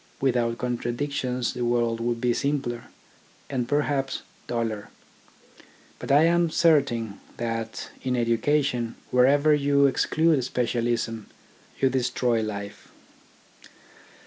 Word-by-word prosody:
With 130 -2 +1
out 115 -1 0
contradictions 125 +1 -2
the 125 - -3
world 120 -1 +1
would 120 0 -1
be 120 0 +1
simpler, 135 -3 -2 0.7
and 125 -3 -2
perhaps 145 -2 0 0.2
duller. 115 -3 -3 1.1
But - - -4
I 145 +3 +6
am 170 0 +3
certain 135 -11 +2 0.2
that 115 -1 -4
in 125 -1 -1
education 120 +1 +1 0.2
wherever 140 +4 +4
you 140 -1 +3
exclude 155 +1 +2
specialism 120 -2 -1 0.5
you 135 -1 +3
destroy 125 -2 +1
life. 100 -2 -6
125 Hz, 105 wpm, -25 LUFS, 115-140 Hz, 1.1 s, I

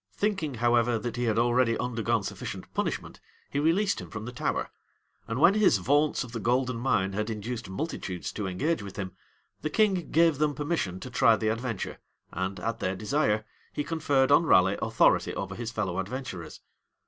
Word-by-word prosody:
Thinking, 190 -10 -1
however, 120 0 +3
that 110 +1 -4
he 120 0 -1
had 110 -1 +1
already 120 0 +3
undergone 115 -2 0
sufficient - - -6
punishment, - - -3 0.3
he 140 - 0
released 185 +7 +2
him - - -9
from 110 -1 -6
the 120 - -5
Tower; 125 - -2 0.6
and 115 +2 -2
when 175 +6 +7
his 210 - +4
vaunts 145 +11 +2
of 120 - -10
the 115 - -4
golden 125 +2 +1
mine 100 -6 +1
had 105 +2 -2
induced 110 0 -5
multitudes 95 - -4
to 105 -3 -4
engage 135 - 0
with 100 -1 -8
him, 95 -2 -4 0.5
the 155 - -1
king 190 -2 +2
gave 165 -3 +4
them 150 -1 +1
permission 145 - -2
to 130 - -7
try 115 -2 +5
the 110 0 -1
adventure, 115 -2 -3 0.3
and, 95 +2 -3
at 115 +4 -3
their 95 +1 -1
desire, 110 0 0 0.3
he 145 - -1
conferred 145 -4 +1
on 145 - +6
Raleigh 95 -2 +5
authority - - +3
over 95 -1 -4
his 115 +3 -4
fellow 100 -6 -2
adventurers. 95 -4 -6
120 Hz, 185 wpm, -28 LUFS, 105-145 Hz, 0.6 s, when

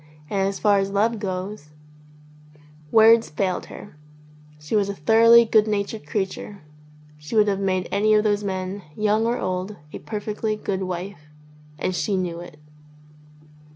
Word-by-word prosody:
And 195 -1 +1
as 195 - -3
far 205 -2 +3
as 195 0 -1
love 215 +3 0
goes.. 190 -4 -5 0.6
." 150 0 -25
Words 225 +1 +6
failed 185 +4 -2
her. 205 - -11 0.6
She 150 +7 -4
was 200 -1 +2
a 200 - -4
thoroughly 230 +7 +6
good 220 -1 +3
natured 205 -4 -3
creature. 195 +2 -4 0.6
She 150 +8 -7
would 210 -1 +4
have 195 -1 0
made 185 -2 -1
any 215 +2 +3
of 210 - +3
those 205 -1 +1
men, 190 0 -4 0.2
young 215 +1 +1
or 235 - 0
old, 185 +2 -3 0.2
a - - -6
perfectly 215 0 -3
good 195 -2 -3
wife. 180 -3 -6 0.5
And 185 - -2
she 195 +2 -1
knew 175 -2 -3
it. 175 -3 -11
200 Hz, 155 wpm, -23 LUFS, 185-215 Hz, 0.6 s, Words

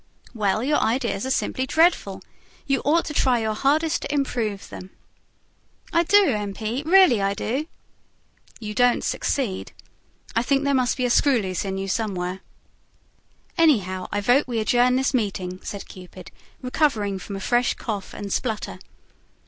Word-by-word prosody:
"Well, 215 -1 0
your 295 +3 +2
ideas 235 -1 -1
are - - -3
simply 260 0 -1
dreadful. 335 +5 +2 0.4
You 275 -3 0
ought 325 +4 +2
to 300 - -5
try 260 -4 +2
your 220 -1 -1
hardest 300 +7 +1
to - - -4
improve 235 -8 -2
them." 185 - -9 1.0
"I 335 - +4
do, 405 +4 +5
M. 205 -4 -2
P., 225 +4 -3
really 360 - +6
I 195 0 0
do." 260 +9 -2 0.9
"You 210 -1 -6
don't 245 +2 +3
succeed. 235 -9 -2 0.6
I 230 - +3
think 275 +3 +1
there 280 0 +1
must 255 -2 +1
be 255 - 0
a 245 - +1
screw 270 0 +4
loose 190 -2 -3
in 190 0 -3
you 195 0 -4
somewhere." 190 -3 -2 1.2
"Anyhow, 195 - +2
I 205 - -1
vote 245 +7 +3
we 240 -2 -3
adjourn 245 +3 +3
this 265 +2 +1
meeting," 190 -6 -2
said 200 - -7
Cupid, 185 0 -12 0.3
recovering 225 -8 0
from 200 +2 -7
a - - -5
fresh 240 +5 +1
cough 205 -4 -5
and 200 -1 -5
splutter. 220 -4 -3
235 Hz, 160 wpm, -23 LUFS, 200-275 Hz, 1.2 s, really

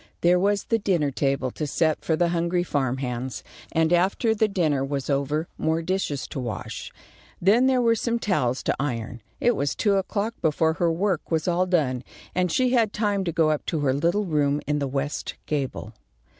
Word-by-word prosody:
There 175 +1 +4
was 200 +1 +1
the 230 - 0
dinner 175 -8 +1
table 135 -1 0
to 150 - -4
set 155 +2 +1
for 160 - +1
the 170 +1 +2
hungry 170 +1 0
farm 135 -6 -1
hands, 125 -1 -4 0.3
and 160 +1 +2
after 195 +6 +2
the 220 0 +2
dinner 155 -9 +1
was 140 0 -2
over 145 +4 0
more 160 +1 0
dishes 180 -6 -1
to - - -5
wash. 120 -4 -5 0.5
Then 220 +8 +4
there 255 -2 +3
were 230 -1 +4
some 235 +1 0
towels 130 - 0
to - - 0
iron. 120 -4 -3 0.2
It 240 -1 +3
was 140 0 -1
two 205 -2 +2
o'clock 205 +3 -1
before 160 +1 +2
her 170 -1 +3
work 180 0 -1
was 160 0 0
all 180 +1 +2
done, 135 -9 +1 0.3
and 180 -1 +1
she 255 +7 +2
had 230 -4 +2
time 205 -2 0
to 170 - 0
go 160 -1 +3
up 150 - -1
to 160 -3 -1
her 135 -2 +2
little 170 +9 +1
room 145 -4 +1
in 150 +1 0
the 140 - -1
west 140 +2 -3
gable. 135 -6 -3
160 Hz, 200 wpm, -25 LUFS, 140-195 Hz, 0.5 s, There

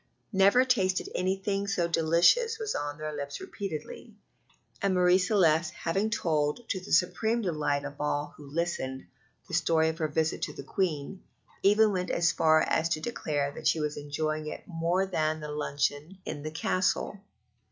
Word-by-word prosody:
"Never 200 +6 +5
tasted 190 -8 +1
anything 195 +2 -1
so 175 -3 +1
delicious" 170 - +3
was 440 -2 -3
on 145 0 -3
their 155 0 -5
lips 140 0 -5
repeatedly; 190 -7 -7 0.7
and 195 -1 +1
Marie 180 0 +5
Celeste 170 -5 +3
having 195 +6 -1
told, 155 +1 0
to 190 - -1
the - - -10
supreme 220 +7 +2
delight 150 -5 -1
of 145 0 -7
all 145 0 -1
who 145 -2 -12
listened, 140 -5 -3 0.4
the 180 - -11
story 160 -1 +3
of 160 - -5
her 155 - +1
visit 160 +1 -1
to - - -3
the - - -8
Queen, 185 0 -2 0.4
even 210 +2 +5
went 180 -2 -2
so 170 -1 +2
far 160 -1 +4
as 160 +1 +1
to 160 - 0
declare 150 -8 -2
that - - -4
she 160 - +3
was 150 -1 -2
enjoying 155 +1 -3
it - - -6
more 175 +2 0
than 155 -4 -1
the 150 -1 -6
luncheon 150 +3 -2
in 145 -2 -5
the 155 - -4
Castle. 185 +5 0
165 Hz, 170 wpm, -29 LUFS, 150-190 Hz, 0.7 s, Never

